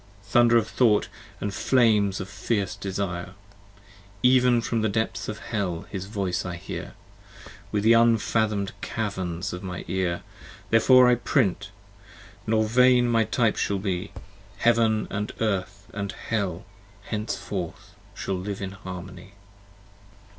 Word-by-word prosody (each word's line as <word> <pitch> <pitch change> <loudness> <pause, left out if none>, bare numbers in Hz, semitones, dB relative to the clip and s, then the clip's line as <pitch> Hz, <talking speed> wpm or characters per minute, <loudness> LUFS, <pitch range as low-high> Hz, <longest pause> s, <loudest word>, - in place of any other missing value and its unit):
Thunder 120 +4 +4
of 110 -2 +1
Thought, 115 -3 +2 0.3
& 100 - -2
flames 105 -3 +2
of 95 - -5
fierce 100 -1 -2
desire: 95 -2 -4 0.9
Even 125 -1 +5
from 115 -1 -1
the 110 - +1
depths 110 +2 -2
of 110 - -4
Hell 95 -7 -3
his 95 -1 -5
voice 100 -4 -2
I 90 -2 -5
hear, 85 - -7 0.8
25 - - -25
Within 105 -1 0
the 115 - +7
unfathom'd 110 -3 +2
caverns 95 -4 -3
of 90 - -6
my 90 -2 -6
Ear. 90 -1 -1 0.5
Therefore 125 +3 +6
I 125 - +6
print; 110 -5 0 0.8
nor 110 0 +3
vain 125 +2 +4
my 115 -1 +3
types 110 0 +1
shall 100 - 0
be: 95 0 -3 0.5
Heaven, 115 -2 +2 0.3
Earth 100 -2 -2 0.2
& 100 - -3 0.2
Hell, 100 -4 -1 0.4
henceforth 100 -3 -5 0.2
shall 95 -2 -3
live 100 +1 -5
in 95 -1 -4
harmony. 95 -1 -9
100 Hz, 130 wpm, -25 LUFS, 95-115 Hz, 0.9 s, the